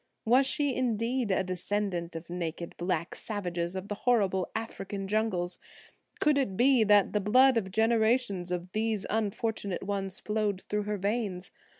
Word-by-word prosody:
Was 255 +4 +5
she, 285 0 +1
indeed, 240 -1 0
a 190 - +2
descendant 185 -1 -2
of 165 +1 -7
naked 170 -1 -5
black 175 -1 -2
savages 175 -4 -3
of 190 +1 -5
the 205 - -3
horrible 200 -5 +1
African 200 -3 -4
jungles? 190 -4 -1 0.6
Could 300 -2 +3
it 195 -9 -1
be 255 -1 +5
that 205 -1 +4
the 210 - +1
blood 255 +6 +5
of 205 -5 0
generations 220 -3 +2
of 180 0 -3
these 215 -1 -1
unfortunate 210 -2 -2
ones 195 -1 -3
flowed 210 -3 -1
through 210 0 -2
her 210 0 -2
veins? 200 -2 -2
205 Hz, 155 wpm, -29 LUFS, 185-225 Hz, 0.6 s, Was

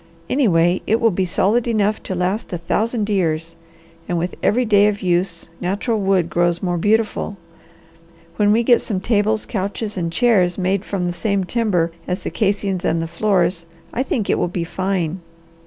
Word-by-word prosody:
Anyway, 180 - +3
it 225 - +2
will 230 -1 +3
be 185 +1 0
solid 215 +7 +1
enough 215 -2 +1
to 190 - -4
last 180 +5 -2
a 175 - -2
thousand 215 +5 -1
years, 165 -5 -1 0.5
and 175 - 0
with 175 +2 -2
every 245 +4 +2
day 205 -2 +5
of 205 -1 -2
use 175 -1 0
natural 205 +5 -1
wood 190 -3 +2
grows 175 0 0
more 175 -2 0
beautiful. 215 +1 0 1.0
When 205 0 +3
we 230 +3 +3
get 240 0 +4
some 200 -5 -2
tables, 215 +1 +1
couches, 205 +1 -3
and 170 -2 -2
chairs 190 -5 +2
made 190 +1 0
from 190 -3 -2
the 175 - -1
same 200 +2 0
timber 180 -5 0 0.2
as 180 +2 -3
the - - -3
casings 200 -3 -1
and 165 -2 +1
the 165 - -2
floors, 175 -1 0 0.3
I 245 - 0
think 240 -5 -1
it - - +1
will - - +1
be 175 0 -3
fine. 185 -1 -2
195 Hz, 180 wpm, -20 LUFS, 175-215 Hz, 1.0 s, day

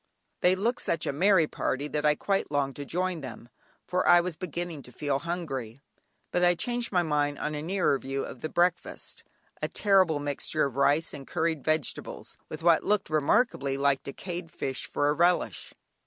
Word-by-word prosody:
They 180 +1 +4
looked 230 +6 0
such 165 -2 0
a - - -1
merry 185 +2 +4
party 145 -1 -2
that 150 0 0
I 150 - +4
quite 195 +5 -1
longed 140 -2 0
to 145 - -5
join 180 +1 -2
them, 120 -2 -9 0.4
for 180 - 0
I 175 - +8
was 175 -1 -2
beginning 170 -3 -5
to 125 - -11
feel 140 +1 -1
hungry, 140 -9 -4 0.5
but 180 - +1
I 175 0 +5
changed 240 +5 -2
my 180 -3 +3
mind 145 -2 0
on 150 - -3
a 150 - -3
nearer 170 -4 +1
view 135 +1 -3
of 125 - -9
the 155 - -3
breakfast, 175 +1 -1 0.4
a - - 0
terrible 190 -6 +3
mixture 145 -1 -1
of 135 -3 -4
rice 145 +3 +2
and 135 -2 -9
curried 160 -3 -1
vegetables, 155 0 -2
with 155 +1 -7
what 170 -1 +5
looked 205 -5 0
remarkably 145 - +2
like 140 -1 +2
decayed 170 +3 -6
fish 135 -5 -4
for 145 - 0
a 145 - +3
relish. 175 +3 +1
155 Hz, 185 wpm, -28 LUFS, 140-180 Hz, 0.5 s, I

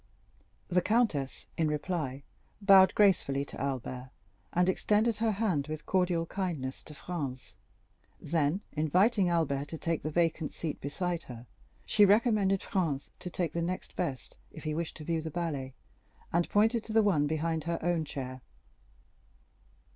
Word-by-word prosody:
The 180 0 +2
countess, 210 - 0
in 160 - +2
reply, 150 -3 -2 0.4
bowed 195 -2 +7
gracefully 150 -9 +3
to - - -8
Albert, 130 -1 -3 0.4
and 180 +1 +2
extended 210 +4 +2
her 225 -1 +1
hand 190 -9 0
with 155 0 -6
cordial 180 -3 +1
kindness 165 -9 -3
to 150 - -10
Franz; 140 -6 -5 0.6
then, 160 +3 0
inviting 185 +6 +3
Albert 145 -5 0
to 160 - -6
take 165 0 -1
the 155 - -3
vacant 165 -1 0
seat 160 -3 -4
beside 175 +4 -2
her, 120 -1 -8 0.4
she 210 - +4
recommended 205 -2 +4
Franz 160 -8 -1
to 180 - -5
take 170 -3 -2
the 170 - -1
next 180 +2 -4
best, 135 -9 -4
if 155 - -11
he 155 - -2
wished 165 +1 -3
to 155 - -8
view 165 +1 -1
the 160 - -5
ballet, 145 -6 -3 0.6
and 170 0 +2
pointed 220 +2 +3
to 220 - -5
the 220 0 +5
one 155 -8 +3
behind 160 +1 -1
her 170 0 -1
own 175 -1 +1
chair. 130 -3 -6
165 Hz, 155 wpm, -30 LUFS, 145-190 Hz, 0.6 s, bowed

